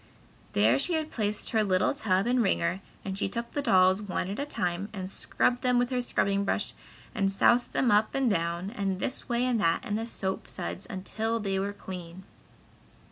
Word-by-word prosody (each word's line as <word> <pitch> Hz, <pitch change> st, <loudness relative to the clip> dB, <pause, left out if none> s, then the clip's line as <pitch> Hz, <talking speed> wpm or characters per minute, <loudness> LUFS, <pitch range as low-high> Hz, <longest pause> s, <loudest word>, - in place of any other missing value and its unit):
There 110 Hz, +6 st, +4 dB
she 355 Hz, -, +1 dB
had 315 Hz, -1 st, -1 dB
placed 210 Hz, -2 st, -1 dB
her 220 Hz, -2 st, +3 dB
little 185 Hz, -2 st, +2 dB
tub 200 Hz, -9 st, +1 dB
and 245 Hz, +1 st, +2 dB
wringer 190 Hz, -2 st, +1 dB, 0.2 s
and 190 Hz, -1 st, -3 dB
she 195 Hz, -, -1 dB
took 235 Hz, +3 st, -4 dB
the 290 Hz, -, -1 dB
dolls 190 Hz, -5 st, +4 dB
one 190 Hz, -2 st, -3 dB
at 205 Hz, -, -4 dB
a 285 Hz, -, -2 dB
time, 180 Hz, -5 st, -2 dB
and 190 Hz, -3 st, -4 dB
scrubbed 245 Hz, +5 st, 0 dB
them 250 Hz, -1 st, +2 dB
with 245 Hz, +1 st, +1 dB
a 250 Hz, -1 st, +1 dB
scrubbing 200 Hz, -4 st, +1 dB
brush 200 Hz, -, -1 dB, 0.4 s
and 195 Hz, -1 st, +1 dB
soused 240 Hz, +5 st, +3 dB
them 250 Hz, -4 st, +2 dB
up 210 Hz, +1 st, +3 dB
and 270 Hz, -1 st, +2 dB
down 170 Hz, -1 st, 0 dB
and 195 Hz, -5 st, -2 dB
this 260 Hz, -, -3 dB
way 240 Hz, +1 st, +1 dB
and 245 Hz, -4 st, +1 dB
that 165 Hz, -3 st, +1 dB
in 205 Hz, -, -3 dB
the 225 Hz, +1 st, -3 dB
soap 190 Hz, -4 st, -2 dB
suds 190 Hz, -, -5 dB
until 220 Hz, +3 st, -2 dB
they 195 Hz, -2 st, -1 dB
were 200 Hz, +1 st, -1 dB
clean. 185 Hz, -2 st, -8 dB
205 Hz, 200 wpm, -28 LUFS, 190-240 Hz, 0.4 s, There